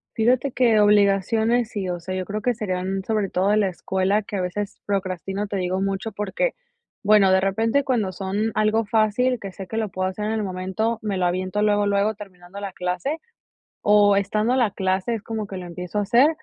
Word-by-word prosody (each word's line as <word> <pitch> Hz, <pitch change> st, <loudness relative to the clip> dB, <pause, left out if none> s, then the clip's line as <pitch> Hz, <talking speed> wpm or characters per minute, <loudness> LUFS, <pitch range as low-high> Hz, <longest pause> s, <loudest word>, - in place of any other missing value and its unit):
Fíjate 245 Hz, +4 st, +2 dB
que 235 Hz, -4 st, +4 dB
obligaciones 210 Hz, +3 st, +3 dB
sí, 195 Hz, -3 st, -3 dB
o 175 Hz, -1 st, -3 dB
sea, 185 Hz, +2 st, -5 dB
yo 185 Hz, -, -2 dB
creo 210 Hz, +3 st, -4 dB
que 245 Hz, +3 st, +1 dB
serían 190 Hz, -2 st, -2 dB
sobre 215 Hz, -3 st, 0 dB
todo 190 Hz, +3 st, +1 dB
de 210 Hz, -, +3 dB
la 210 Hz, -2 st, +3 dB
escuela, 190 Hz, +2 st, 0 dB
que 205 Hz, -1 st, -5 dB
a -, -, -1 dB
veces 195 Hz, +3 st, -4 dB
procrastino, 195 Hz, 0 st, -2 dB
te 200 Hz, -, -3 dB
digo 185 Hz, +1 st, -1 dB
mucho 195 Hz, +3 st, -2 dB
porque, 210 Hz, -, -1 dB, 0.5 s
bueno, 205 Hz, -2 st, +5 dB
de 190 Hz, -, +4 dB
repente 225 Hz, +8 st, +1 dB
cuando 225 Hz, -8 st, 0 dB
son 200 Hz, +4 st, -2 dB
algo 215 Hz, +1 st, +2 dB
fácil, 225 Hz, +4 st, +2 dB
que 195 Hz, -, -6 dB
sé 190 Hz, 0 st, -9 dB
que 220 Hz, -, -6 dB
lo 220 Hz, -2 st, -1 dB
puedo 185 Hz, 0 st, -2 dB
hacer 190 Hz, +3 st, -4 dB
en 220 Hz, -, -1 dB
el 220 Hz, -1 st, -1 dB
momento, 190 Hz, +5 st, -2 dB
me 205 Hz, -3 st, -2 dB
lo 180 Hz, -, +1 dB
aviento 185 Hz, +3 st, -1 dB
luego 205 Hz, -1 st, +3 dB
luego 200 Hz, +1 st, +2 dB
terminando 195 Hz, -1 st, -11 dB
la 200 Hz, -, -4 dB
clase, 180 Hz, -, -2 dB, 0.6 s
o 205 Hz, -1 st, +5 dB
estando 215 Hz, +5 st, +1 dB
la 240 Hz, -5 st, +2 dB
clase 190 Hz, +3 st, -1 dB
es 220 Hz, -, -5 dB
como 220 Hz, -2 st, -4 dB
que 195 Hz, -1 st, -7 dB
lo 180 Hz, -, -7 dB
empiezo 180 Hz, +3 st, -4 dB
a -, -, +1 dB
hacer, 235 Hz, +8 st, +5 dB
205 Hz, 210 wpm, -23 LUFS, 190-220 Hz, 0.6 s, bueno